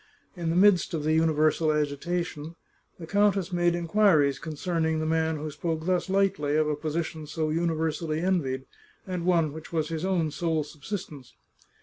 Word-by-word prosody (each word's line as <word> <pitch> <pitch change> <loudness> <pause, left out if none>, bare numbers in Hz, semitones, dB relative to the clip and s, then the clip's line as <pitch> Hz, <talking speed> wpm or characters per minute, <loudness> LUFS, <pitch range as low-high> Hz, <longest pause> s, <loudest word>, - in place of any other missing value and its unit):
In 170 -2 -3
the 165 - 0
midst 185 -2 +4
of 155 - -3
the 155 +1 +1
universal 155 0 +2
agitation, 155 +2 -2 0.4
the 170 - -8
countess 200 0 +1
made 175 0 +2
inquiries 170 -5 +3
concerning 160 0 -1
the 155 - -1
man 160 0 +1
who 155 +1 -5
spoke 160 +1 -3
thus 185 0 0
lightly 190 -7 +1
of 155 0 +2
a 150 - 0
position 155 +1 -4
so 155 0 -2
universally 160 -1 -1
envied, 150 -8 0 0.4
and 180 -2 -3
one 165 -5 +2
which 160 0 -10
was 160 -2 -1
his 160 0 -3
own 175 -5 0
sole 160 +1 -1
subsistence. 150 - -8
160 Hz, 160 wpm, -27 LUFS, 155-175 Hz, 0.4 s, midst